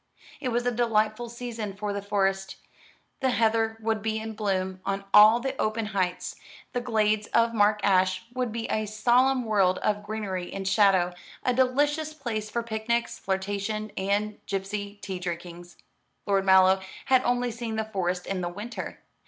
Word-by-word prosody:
It 260 - -3
was 240 0 0
a 245 - +2
delightful 230 0 +1
season 230 -4 -5
for 205 0 -3
the 200 - -3
Forest. 195 -1 0 0.6
The 265 - +1
heather 225 -2 +1
would 220 -1 -1
be 220 +1 -1
in 220 0 -5
bloom 190 -3 -2
on 195 0 -2
all 215 +3 +8
the 265 +2 -3
open 215 +1 0
heights, 185 -2 -1 0.4
the 245 - -1
glades 215 -3 +1
of 230 0 +4
Mark 210 -1 +3
Ash 185 +1 +2
would 250 -2 -1
be 230 +1 -3
a 215 0 0
solemn 245 +5 +3
world 195 -4 +3
of 210 -1 +1
greenery 205 -4 -4
and 195 -1 -4
shadow, 190 -3 +4 0.3
a 250 - +2
delicious 290 +5 +1
place 220 -7 -4
for 235 +2 -2
picnics, 230 +1 -2
flirtation, 200 +2 -2
and 205 +2 -1
gipsy 200 +1 -3
tea 190 -2 -4
drinkings. 175 0 -7 0.5
Lord 195 -1 +1
Mallow 190 0 +6 0.2
had 260 -1 +4
only 245 0 +1
seen 230 -1 -4
the 220 0 -1
Forest 185 -4 -2
in 195 -1 -2
the 175 - -2
winter. 210 +7 -7
215 Hz, 165 wpm, -27 LUFS, 195-230 Hz, 0.6 s, all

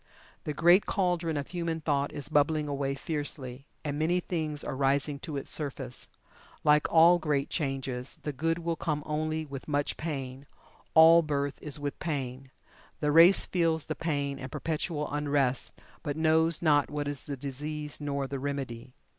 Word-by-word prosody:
The 150 - -2
great 175 +5 +5
cauldron 175 -5 0
of 140 - -4
human 170 -2 -2
thought 145 -2 0
is 145 - -4
bubbling 150 0 +2
away 140 -1 -1
fiercely, 140 -3 -4 0.2
and 145 -1 -3
many 170 +3 +2
things 155 -5 -3
are 140 - -4
rising 140 +1 +1
to 145 0 -5
its 135 - -2
surface. 135 -4 -2 0.6
Like 150 0 +4
all 170 +2 +7
great 145 -3 -1
changes, 135 -4 -2
the 150 - -3
good 165 +5 0
will 170 -1 -2
come 150 -2 -2
only 155 +1 -2
with 140 -2 -8
much 145 -1 -1
pain 135 -3 -5 0.5
all 165 +1 +9
birth 145 -3 -2
is 150 -1 -4
with 145 -1 -4
pain. 135 -4 -4 0.5
The 150 -1 +1
race 170 +5 +7
feels 165 -3 +1
the 155 - -3
pain 145 -4 -2
and 130 -1 -7
perpetual 155 -1 -2
unrest, 145 -3 0 0.2
but 145 -1 -3
knows 160 +1 +2
not 145 -3 +4
what 145 -1 -3
is 145 -2 -4
the 140 -2 -5
disease 150 +3 -5
nor 140 -1 -2
the 135 0 -4
remedy. 130 -3 -5
150 Hz, 165 wpm, -29 LUFS, 140-160 Hz, 0.6 s, all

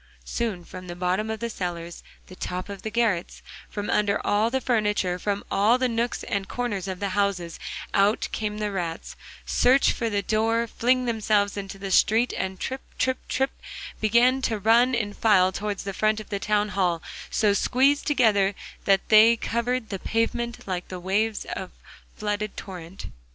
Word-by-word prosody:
Soon 200 - -3
from 185 0 -9
the 175 - -6
bottom 185 +4 -1
of 220 0 -4
the 235 - -2
cellars, 175 -3 -5 0.2
the 185 - -12
top 180 +1 -5
of 200 -1 -7
the 220 - -4
garrets, 215 -6 0 0.3
from 205 -1 -4
under 205 -1 +2
all 210 +2 +2
the 265 +2 0
furniture, 210 -7 0
from 205 +1 -2
all 215 +5 +4
the 255 0 +1
nooks 235 0 -1
and 200 -1 -2
corners 210 -6 -3
of 185 -1 -4
the 200 - -1
houses, 190 -4 -1 0.3
out 200 +2 +3
come 210 -1 -2
the 210 -1 -2
rats, 170 -4 -4 0.3
search 260 +3 +4
for 230 - -2
the 205 -2 -1
door, 225 +3 +1
fling 250 +2 +1
themselves 215 -3 +1
into 195 -1 -6
the 195 0 -5
street, 225 +6 +4
and 190 0 -3
trip, 265 +1 -4 0.2
trip, 260 0 +1
trip, 265 +1 +1 0.5
begin 240 +5 +4
to 225 -4 0
run 235 +5 +4
in 210 -3 -2
file 190 -5 +4
towards 205 +1 -3
the 195 - -4
front 215 +2 +1
of 215 - -10
the 200 - -2
town 210 0 +1
hall, 180 -4 0 0.3
so 210 -2 +2
squeezed 270 +7 +2
together 210 -9 +3 0.3
that 195 -1 +3
they 225 +2 +7
covered 235 +1 -1
the 195 - -4
pavement 235 +2 -2
like 180 -2 -3
the 185 - -6
waves 205 +4 0
of - - -5 0.5
flooded 210 0 -3
torrent. 180 -2 -8
210 Hz, 175 wpm, -25 LUFS, 195-230 Hz, 0.5 s, they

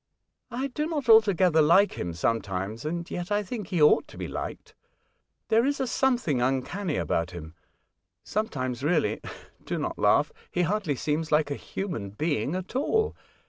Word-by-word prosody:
"I 255 +3 -3
do 300 +3 -2
not 295 -6 -3
altogether 190 -7 +6
like 170 +7 +5
him 85 -1 -4
sometimes, 105 - -2
and 170 +2 -3
yet 175 +2 -4
I 205 0 +2
think 210 +1 -5
he 180 -4 -1
ought 150 - +5
to - - -14
be - - -4
liked. - - -6 0.8
There 225 +1 +4
is 280 +2 0
a 265 - +1
something 240 - +1
uncanny 135 +8 -1
about 85 0 0
him. 80 -3 -9 0.7
Sometimes, 130 - -2
really 165 +5 +1 0.2
— - - -26
do - - -1
not - - -3
laugh - - +3
— - - -31
he 180 - +1
hardly 185 -4 0
seems 155 +4 -2
like 150 -1 +3
a - - 0
human 165 - -5
being 150 - -1
at 185 +5 -6
all. 440 +11 +1
170 Hz, 175 wpm, -27 LUFS, 130-215 Hz, 0.8 s, altogether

